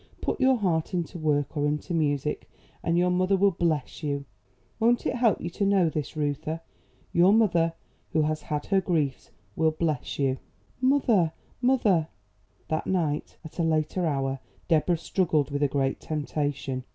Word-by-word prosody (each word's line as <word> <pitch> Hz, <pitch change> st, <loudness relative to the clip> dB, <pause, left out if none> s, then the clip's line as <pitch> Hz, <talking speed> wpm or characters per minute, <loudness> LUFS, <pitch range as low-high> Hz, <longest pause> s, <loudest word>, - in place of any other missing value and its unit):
Put -, -, -2 dB
your 260 Hz, 0 st, +5 dB
heart 175 Hz, -5 st, 0 dB
into 175 Hz, 0 st, -3 dB
work 150 Hz, -1 st, 0 dB
or 145 Hz, -1 st, +1 dB
into 150 Hz, +4 st, -2 dB
music, 150 Hz, -2 st, -1 dB, 0.3 s
and 170 Hz, +1 st, +1 dB
your 180 Hz, +1 st, +3 dB
mother 185 Hz, +2 st, +2 dB
will 200 Hz, +1 st, +4 dB
bless 160 Hz, -6 st, -1 dB
you. 140 Hz, -2 st, -2 dB, 0.5 s
Won't 235 Hz, +2 st, +3 dB
it -, -, 0 dB
help 230 Hz, -5 st, +3 dB
you 175 Hz, -, -5 dB
to 200 Hz, -, -2 dB
know 195 Hz, -4 st, +3 dB
this, 155 Hz, +1 st, -4 dB
Reuther? 150 Hz, +2 st, -2 dB, 0.5 s
Your 175 Hz, +3 st, +6 dB
mother, 175 Hz, -7 st, +3 dB, 0.4 s
who 155 Hz, -, +2 dB
has 155 Hz, 0 st, -1 dB
had 150 Hz, -1 st, -3 dB
her 195 Hz, -1 st, +2 dB
griefs, 155 Hz, -7 st, -1 dB, 0.3 s
will 160 Hz, 0 st, +3 dB
bless 155 Hz, -3 st, -2 dB
you." 135 Hz, -2 st, 0 dB, 0.4 s
"Mother, 240 Hz, -, +3 dB, 0.3 s
mother!" 215 Hz, -11 st, +3 dB, 0.6 s
That 155 Hz, 0 st, -2 dB
night, 160 Hz, -6 st, -1 dB
at 160 Hz, -, -10 dB
a -, -, +2 dB
later 160 Hz, +2 st, +1 dB
hour, 135 Hz, -2 st, -1 dB, 0.3 s
Deborah 165 Hz, +1 st, +3 dB
struggled 160 Hz, -4 st, 0 dB
with 145 Hz, 0 st, -2 dB
a 145 Hz, -, +4 dB
great 135 Hz, -1 st, 0 dB
temptation. 145 Hz, -3 st, -3 dB
160 Hz, 165 wpm, -27 LUFS, 145-185 Hz, 0.6 s, Your